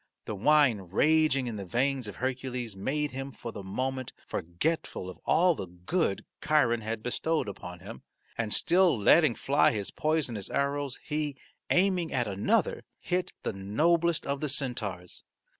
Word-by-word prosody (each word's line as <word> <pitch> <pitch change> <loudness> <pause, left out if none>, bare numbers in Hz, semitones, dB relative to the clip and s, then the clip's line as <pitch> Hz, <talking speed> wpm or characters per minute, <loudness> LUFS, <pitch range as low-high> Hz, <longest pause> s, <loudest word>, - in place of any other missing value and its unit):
The - - -4
wine 115 -3 +3
raging 150 - +3
in 115 -3 -4
the 100 - -5
veins 125 +5 0
of 105 - -7
Hercules 125 -3 -3
made 145 +9 -1
him 135 +1 -5
for 115 - -7
the 105 - -7
moment 130 +6 -3
forgetful 90 - -2
of - - -15
all 175 +1 +4
the 95 - -6
good 95 - -1 0.2
Chiron 120 -7 +3
had 110 0 -4
bestowed 155 +3 -1
upon 90 -3 -8
him, 90 -9 -9 0.3
and 110 -2 -2
still 180 - +4
letting 135 +4 +5
fly 140 +2 +3
his 100 -3 -3
poisonous 145 -10 -1
arrows 140 -1 -1
he, 150 -2 -2 0.3
aiming 180 -2 +2
at 120 -3 0
another, 100 0 +1 0.2
hit 180 0 -1
the - - -2
noblest 160 - +1
of 140 0 -2
the 150 - -1
centaurs. 110 -10 -2
130 Hz, 155 wpm, -29 LUFS, 105-150 Hz, 0.3 s, letting